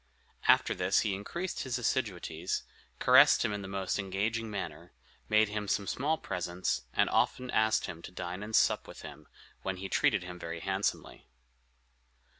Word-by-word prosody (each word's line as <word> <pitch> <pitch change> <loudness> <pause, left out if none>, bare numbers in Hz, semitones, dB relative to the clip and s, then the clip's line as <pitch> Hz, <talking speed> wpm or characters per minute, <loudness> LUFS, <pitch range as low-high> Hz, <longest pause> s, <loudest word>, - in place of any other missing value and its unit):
After - - +5
this - - +2
he 100 - 0
increased 170 - -4
his 130 -3 -2
assiduities, 95 -9 -2 0.3
caressed - - +6
him 105 - 0
in 105 - -3
the 95 - -7
most 95 0 -2
engaging 105 +4 -2
manner, 85 -4 -6 0.4
made 110 0 +4
him 105 0 -3
some 100 +1 0
small 145 +10 0
presents, 90 - -2
and - - +2
often 125 -1 +1
asked 110 0 +2
him 85 - -7
to 85 - -9
dine 90 +1 -5
and 110 +1 -3
sup - - +3
with - - -11
him, - - -10 0.3
when 95 -1 -3
he 95 +1 -6
treated 105 -5 +2
him 90 0 -8
very 85 0 -5
handsomely. 95 +1 -2
100 Hz, 165 wpm, -31 LUFS, 90-110 Hz, 0.4 s, caressed